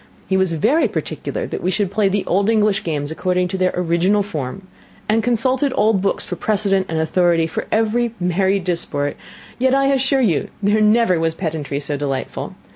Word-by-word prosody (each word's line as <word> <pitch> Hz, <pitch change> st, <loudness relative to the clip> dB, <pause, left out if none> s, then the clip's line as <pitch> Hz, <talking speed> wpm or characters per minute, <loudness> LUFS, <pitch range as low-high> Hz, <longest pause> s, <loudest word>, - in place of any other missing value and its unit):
He 190 Hz, -, 0 dB
was 190 Hz, -2 st, +1 dB
very 225 Hz, -, +2 dB
particular -, -, -4 dB
that -, -, -5 dB
we 180 Hz, -, 0 dB
should 195 Hz, 0 st, 0 dB
play 205 Hz, -1 st, +2 dB
the 200 Hz, 0 st, -1 dB
old 200 Hz, +3 st, +1 dB
English 215 Hz, -2 st, +2 dB
games 150 Hz, -2 st, -3 dB
according 180 Hz, +2 st, 0 dB
to 190 Hz, -, -4 dB
their 185 Hz, 0 st, +2 dB
original 180 Hz, +4 st, +1 dB
form 170 Hz, -1 st, -5 dB, 0.4 s
and 220 Hz, +1 st, +2 dB
consulted 255 Hz, +4 st, +1 dB
old 210 Hz, -2 st, +2 dB
books 195 Hz, -, -1 dB
for 180 Hz, -, -4 dB
precedent 195 Hz, -2 st, 0 dB
and 165 Hz, -, -2 dB
authority 165 Hz, +1 st, +2 dB
for 160 Hz, -, -4 dB
every 225 Hz, +1 st, +1 dB
'merrie 190 Hz, +2 st, +1 dB
disport;' 170 Hz, -5 st, -1 dB, 0.4 s
yet 260 Hz, +1 st, +3 dB
I 275 Hz, 0 st, +3 dB
assure 270 Hz, 0 st, +2 dB
you 180 Hz, -, +1 dB, 0.2 s
there 205 Hz, +2 st, +3 dB
never 215 Hz, -4 st, +3 dB
was 165 Hz, 0 st, 0 dB
pedantry 155 Hz, -5 st, -3 dB
so 145 Hz, 0 st, -3 dB
delightful. 135 Hz, -2 st, -4 dB
190 Hz, 185 wpm, -19 LUFS, 170-215 Hz, 0.4 s, yet